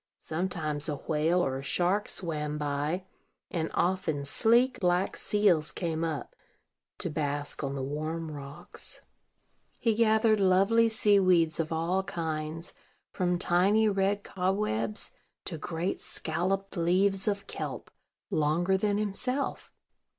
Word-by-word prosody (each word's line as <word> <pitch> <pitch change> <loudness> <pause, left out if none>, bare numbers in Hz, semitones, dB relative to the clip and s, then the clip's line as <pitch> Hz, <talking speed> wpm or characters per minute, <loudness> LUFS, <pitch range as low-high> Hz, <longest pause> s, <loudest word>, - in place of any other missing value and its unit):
Sometimes 160 -3 -2
a 150 - -1
whale 160 +5 +1
or 135 0 -2
a - - -6
shark 180 +8 0
swam 150 -4 -2
by, 150 +5 -2 0.5
and 160 -3 -1
often 170 -6 0
sleek 235 - +3
black 180 0 +1
seals 180 -8 +2
came 165 -2 -2
up 165 - -3 0.6
to 185 - -1
bask 145 -1 -2
on 140 0 -2
the 135 - -3
warm 155 +3 -3
rocks. 140 0 -7 0.8
He 230 -2 +2
gathered 220 -1 +3
lovely 195 +5 +4
sea 210 -2 +4
weeds 170 -4 +3
of 160 -1 -1
all 165 +4 +1
kinds, 165 -3 -4 0.4
from 180 -1 0
tiny 190 +5 +3
red 200 0 +1
cobwebs 180 - -1 0.3
to 160 - -5
great 170 +3 -2
scalloped 190 +5 -2
leaves 190 +3 +2
of 200 -1 0
kelp, - - -6 0.4
longer 170 +5 +2
than 205 +1 +1
himself. 250 +7 -2
175 Hz, 125 wpm, -29 LUFS, 155-195 Hz, 0.8 s, lovely